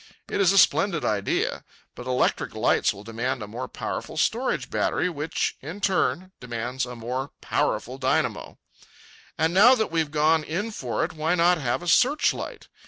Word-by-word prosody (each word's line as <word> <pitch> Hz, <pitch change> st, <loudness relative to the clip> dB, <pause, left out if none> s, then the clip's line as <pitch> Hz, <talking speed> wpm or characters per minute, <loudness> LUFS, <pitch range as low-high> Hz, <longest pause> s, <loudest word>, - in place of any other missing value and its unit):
It -, -, -1 dB
is 190 Hz, -2 st, +5 dB
a 195 Hz, -, +2 dB
splendid 195 Hz, -4 st, +3 dB
idea. 100 Hz, -2 st, -1 dB, 0.3 s
But 125 Hz, -, -9 dB
electric 125 Hz, 0 st, 0 dB
lights -, -, +2 dB
will 100 Hz, -, -10 dB
demand 115 Hz, +2 st, -3 dB
a -, -, -7 dB
more 120 Hz, +5 st, -6 dB
powerful -, -, -5 dB
storage -, -, 0 dB
battery, 180 Hz, -, 0 dB
which, 150 Hz, 0 st, -2 dB
in 160 Hz, +9 st, -7 dB
turn, 185 Hz, -1 st, 0 dB
demands 125 Hz, +1 st, -4 dB
a 125 Hz, -, -7 dB
more 125 Hz, +4 st, -4 dB
powerful 130 Hz, +3 st, -1 dB
dynamo. 130 Hz, 0 st, -1 dB, 0.8 s
And 160 Hz, +2 st, +1 dB
now 230 Hz, +8 st, +7 dB
that 220 Hz, -7 st, -1 dB
we've 160 Hz, -2 st, 0 dB
gone 155 Hz, +1 st, +2 dB
in 190 Hz, +9 st, -3 dB
for 125 Hz, -, -2 dB
it, -, -, -7 dB
why 160 Hz, +2 st, 0 dB
not 175 Hz, 0 st, +3 dB
have 130 Hz, +4 st, -1 dB
a -, -, -7 dB
searchlight? 285 Hz, -, +1 dB
155 Hz, 170 wpm, -25 LUFS, 125-180 Hz, 0.8 s, now